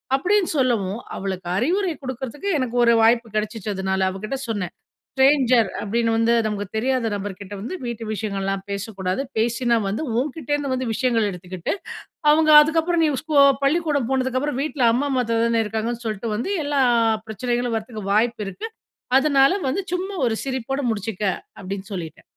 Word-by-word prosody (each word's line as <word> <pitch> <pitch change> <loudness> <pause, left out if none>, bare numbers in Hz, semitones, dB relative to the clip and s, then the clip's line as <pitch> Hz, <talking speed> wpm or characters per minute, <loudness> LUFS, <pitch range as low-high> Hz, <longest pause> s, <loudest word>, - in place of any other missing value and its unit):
அப்டினு 380 +7 +2
சொல்லவும் 225 -6 +1 0.2
அவளுக்கு 190 -2 -4
அறிவுரை 350 - +1
குடுக்குறதுக்கு 265 - -5
எனக்கு 250 -2 -2
ஒரு 235 0 +5
வாய்ப்பு 230 +1 +4
கிடைச்சுச்சு. 215 0 -2
அதனால 190 0 0
அவ 190 +1 -6
கிட்ட 270 +5 -3
சொன்னன், 205 -6 -3 0.4
"ஸ்ட்ரேஞ்சர் 265 -4 +4
அப்டின்னு 230 +2 0
வந்து 230 +1 +3
நமக்கு 205 -1 -3
தெரியாத 250 +1 +1
நபர்கிட்ட 200 0 -7
வந்து 235 - -5
வீட்டு 235 -1 -5
விஷயங்கள்லாம் 195 -2 -3
பேசக்கூடாது. 200 +1 -3 0.2
பேசினா 235 +1 +2
வந்து 210 +10 -2 0.2
உன்கிட்டேருந்து 290 0 -2
வந்து 255 -1 -2
விஷயங்கள் 230 -3 +1
எடுத்துக்கிட்டு, 180 -1 -4 0.6
அவங்க 310 0 +4
அதுக்கப்புறம் 330 +2 +1
நீ 310 - +3
ஸ்கோ 310 -2 +1 0.3
பள்ளிக்கூடம் 290 -4 +1
போனதுக்கு 260 -1 0
அப்புறம் 290 -2 -2
வீட்டில் 270 -6 +2
அம்மா 270 +5 0
அம்மா, 260 -2 +2
அத்தை 230 0 0
தானே 230 -1 +2
இருக்காங்கன்னு 225 +2 -3
சொல்ட்டு 215 +1 -3
வந்து 240 - -3
எல்லா 285 -1 +1 0.3
அ - - 0
பிரச்சனைகளும் 240 +2 -1
வரத்துக்கு 220 -1 -6
வாய்ப்பு 225 +1 +1
இருக்கு. 435 - -6 0.5
அதனால 275 -1 +4 0.2
வந்து 390 +9 -1
சும்மா 380 +2 -3
ஒரு 225 -2 0
சிரிப்போடு 270 +1 -2
முடிச்சுக்க 210 -1 -4 0.4
அப்டின்னு 195 +1 -6
சொல்லிட்டன்." 165 -4 -7
235 Hz, 155 wpm, -22 LUFS, 210-270 Hz, 0.6 s, ஒரு